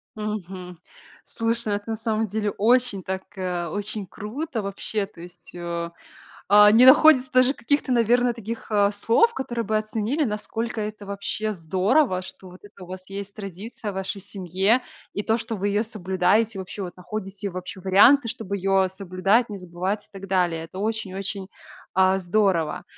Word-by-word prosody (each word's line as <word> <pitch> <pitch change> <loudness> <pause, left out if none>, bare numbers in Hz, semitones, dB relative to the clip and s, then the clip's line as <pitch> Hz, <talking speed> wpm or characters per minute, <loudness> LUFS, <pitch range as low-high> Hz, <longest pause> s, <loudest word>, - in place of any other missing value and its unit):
Мгм. 185 -5 -6 0.4
Слушай, 230 0 0
ну, 205 - +1
это 205 +2 -6
на 220 - -2
самом 225 -1 -1
деле 210 0 -2
очень 235 -2 +2
так, 190 +1 -4
э, 180 -2 -2
очень 205 +3 -5
круто, 230 - -5
вообще, 200 +1 -2
то 195 - -15
есть, 175 +1 -12
э, 170 -1 -4 0.6
а, 210 0 +8
не 230 +4 +7
находится 260 -1 +7
даже 255 +1 +4
каких-то, 285 +1 0
наверно, 245 +1 +3
таких, 230 0 -7
э, 205 -1 +3
слов, 235 - +3
которые 240 - -3
бы 215 +2 -1
оценили, 220 +7 -1
насколько 225 0 -3
это 210 -1 -6
вообще 200 +2 -3
здорово, 185 - +1
что 185 0 -11
вот 180 +1 -14
это 205 -2 -13
у - - -9
вас 185 +1 -9
есть 200 0 -6
традиция 205 +2 -7
в - - -11
вашей 190 +1 -4
семье. 195 +5 +1 0.3
И 205 - -2
то, 225 +1 +2
что 225 0 -4
вы 200 0 -1
ее 205 +2 +1
соблюдаете, 200 0 +1
вообще, 190 +2 -7
вот 175 -1 -7
находите 195 +1 -5
вообще 185 +1 -7
варианты, 230 +8 +6
чтоб 220 -3 -6
ее 195 -1 +2
соблюдать, 195 +5 +1
не 205 - -5
забывать 185 +3 -3
и - - -30
так 195 -1 -9
далее. 175 -4 0
Это 185 +3 -9
очень-очень, 200 -2 -3 0.5
а, 190 0 +4
здорово. 180 -4 +1
205 Hz, 170 wpm, -24 LUFS, 185-225 Hz, 0.6 s, а